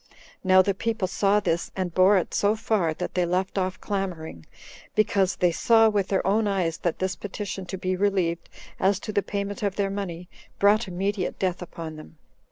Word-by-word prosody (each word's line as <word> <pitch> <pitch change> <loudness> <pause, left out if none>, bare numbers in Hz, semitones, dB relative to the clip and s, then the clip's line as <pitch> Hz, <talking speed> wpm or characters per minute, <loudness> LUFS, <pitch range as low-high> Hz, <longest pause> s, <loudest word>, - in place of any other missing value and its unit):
Now 185 -1 +6
the 200 - +1
people 225 0 -1
saw 200 +2 +2
this, 170 -3 -1
and 185 -3 -2
bore 190 +3 +5
it 180 - -2
so 205 +1 +2
far, 215 -6 0
that 180 - -4
they 180 - +1
left 185 +3 -1
off 185 0 -2
clamoring, 175 - -4 0.5
because 195 -3 +2
they 180 -1 +2
saw 225 +5 +4
with 200 -3 0
their 195 - 0
own 210 +2 +2
eyes 180 -5 0
that 175 - -1
this 190 0 -1
petition 200 -2 -6
to 190 - -5
be 185 0 -1
relieved, 180 -4 0 0.3
as 195 0 +2
to - - -5
the 200 - +2
payment 200 0 -4
of 200 -2 -1
their 200 -1 0
money, 180 -3 -5 0.3
brought 210 +2 +4
immediate 190 +1 -2
death 185 -2 -1
upon 165 -2 -7
them. 155 +1 -13
190 Hz, 190 wpm, -25 LUFS, 180-205 Hz, 0.5 s, Now